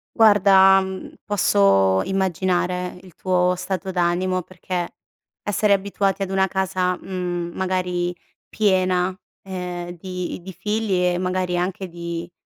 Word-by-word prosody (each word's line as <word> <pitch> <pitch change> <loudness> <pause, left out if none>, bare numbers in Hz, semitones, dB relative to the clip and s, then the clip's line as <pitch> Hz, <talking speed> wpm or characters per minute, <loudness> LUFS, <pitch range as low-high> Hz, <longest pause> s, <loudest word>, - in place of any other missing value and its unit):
Guarda, 195 -3 +6
mhmm, 190 0 -6
posso 100 - +3
immaginare 180 -1 -1
il 185 -3 -16
tuo 180 -1 +1
stato 190 0 -3
d'animo 180 0 0
perché, 180 -1 -5 0.5
essere 205 0 +2
abituati 195 0 0
ad 190 - -1
una 190 0 +2
casa, 185 -1 0
mhmm, 175 -2 -4
magari 180 -1 -1 0.3
piena, 185 -3 +1 0.3
ehm, 180 -2 -5
di 180 +1 -5
di 190 0 -8
figli 210 -3 -1
e - - -1
magari 185 -1 -1
anche 185 +1 -2
di 170 0 -6
185 Hz, 120 wpm, -22 LUFS, 180-190 Hz, 0.5 s, Guarda